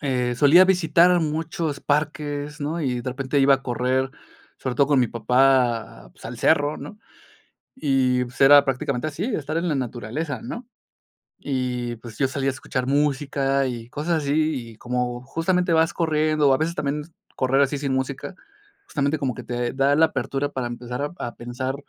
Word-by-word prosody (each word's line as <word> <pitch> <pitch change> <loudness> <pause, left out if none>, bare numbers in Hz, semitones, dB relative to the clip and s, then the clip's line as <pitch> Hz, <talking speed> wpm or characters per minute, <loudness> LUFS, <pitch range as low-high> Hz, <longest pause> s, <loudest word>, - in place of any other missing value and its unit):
eh, 125 -3 0
solía 155 +7 +7
visitar 175 -1 +4
muchos 155 -1 -2
parques, 150 0 -2
¿no?, 160 +4 -2
y 125 -4 -1
de 125 +1 -4
repente 135 +2 -1
iba 135 0 +6
a 135 - -5
correr, 130 +2 0 0.5
sobre 125 -2 -4
todo 140 - +4
con 140 -3 +4
mi 125 - +3
papá, 120 - +1
pues - - -19
al - - -7
cerro 145 +1 +2
¿no?, 215 - -9 0.8
y 130 - +1
pues 125 +3 -12
era 140 +1 +8
prácticamente 135 +1 -1
así, 155 +6 -4
estar 160 - -2
en 170 +1 0
la 150 - 0
naturaleza 125 +2 -4
¿no?, 230 - -7 0.7
y, 125 -3 -3
pues 115 -2 -11
yo 135 - +2
salía 135 0 -1
a - - -2
escuchar 130 -1 -4
música 140 -1 +1
y, 120 -2 -6
cosas 155 +3 -1
así, 140 -5 0
y - - -15
como 125 0 -2
justamente 170 +4 0
vas 160 0 +3
corriendo, 155 -3 +2
o - - +5
a 130 - +3
veces 165 +2 -1
también, 150 -2 -2 0.3
correr 135 +2 +2
así 140 +1 +1
sin 140 -2 -1
música, 130 +7 -3 0.5
justamente, 140 +1 -1
como 130 -4 -1
que - - -8
te 120 0 -3
da 140 +1 +3
la 160 +1 +6
apertura 135 +2 -2
para 130 -4 -3
empezar 120 +2 -6
a 145 - -2 0.2
a - - -8
pensar, 125 +2 -4
140 Hz, 180 wpm, -23 LUFS, 125-150 Hz, 0.8 s, era